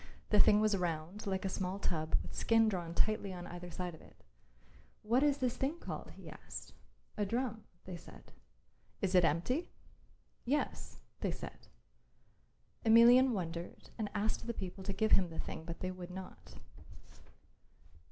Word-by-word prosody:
The 210 - +6
thing 210 0 +7
was 215 -1 +3
round 175 +3 -3
like 190 0 -1
a - - +2
small 185 0 -2
tub 160 -5 -1
with - - -9
skin 225 -1 +4
drawn 175 -5 -2
tightly 215 -2 +1
on 175 -1 -6
either 175 0 -7
side 175 +1 -4
of 160 - -13
it. - - -19 0.8
"What 235 +5 +3
is 290 -1 +4
this 255 -3 0
thing 280 +5 -1
called?" - - -6
he - - -11
asked. - - -9 0.4
"A 210 - +1
drum," 225 +1 -2 0.2
they 180 -2 -6
said. - - -14 0.7
"Is 195 -2 0
it 180 -1 +6
empty?" 210 - +1 0.7
"Yes," 280 +3 -2 0.2
they - - 0
said. - - -7 1.2
Emelian 235 +3 +8
wondered 175 -4 -5
and 215 -3 -3
asked 215 +2 -1
the 235 - -2
people 190 0 -6
to 195 - -1
give 220 +3 +1
him 185 -3 +5
the 160 - -8
thing, 160 - -5
but 170 0 -7
they 185 - -2
would 185 -1 -8
not. 185 0 -9
195 Hz, 160 wpm, -34 LUFS, 175-225 Hz, 1.2 s, Emelian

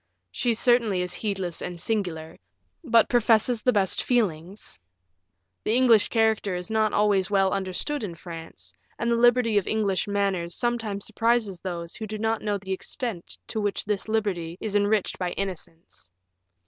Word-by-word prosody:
She 235 - 0
certainly 230 -6 +3
is 180 0 -5
heedless 190 -5 -3
and 175 -1 -5
singular, 170 -6 -2 0.4
but 230 -6 +4
professes 230 0 +3
the 250 - +3
best 200 -5 +1
feelings. 190 - -1 0.8
The 220 - +1
English 240 -4 +5
character 220 -4 +1
is 180 +3 -5
not 220 -1 +2
always 205 -2 +2
well 195 -2 +3
understood 195 +9 -2
in 180 -5 -5
France, 165 -1 -10 0.2
and 235 0 -1
the - - +3
liberty 240 -2 +4
of 190 - -8
English 205 -3 0
manners 195 -4 -1
sometimes 230 -5 -2
surprises 225 -5 0
those 170 -2 -5
who 220 - -6
do 215 +1 -5
not 225 +1 -1
know 205 -1 -1
the 190 -1 -8
extent 195 -1 -4
to 220 - -2
which 205 -1 -1
this 205 -1 -2
liberty 185 -6 -1
is 210 -2 -4
enriched 205 0 +1
by 180 -1 -2
innocence." 170 - -6
205 Hz, 160 wpm, -26 LUFS, 180-225 Hz, 0.8 s, English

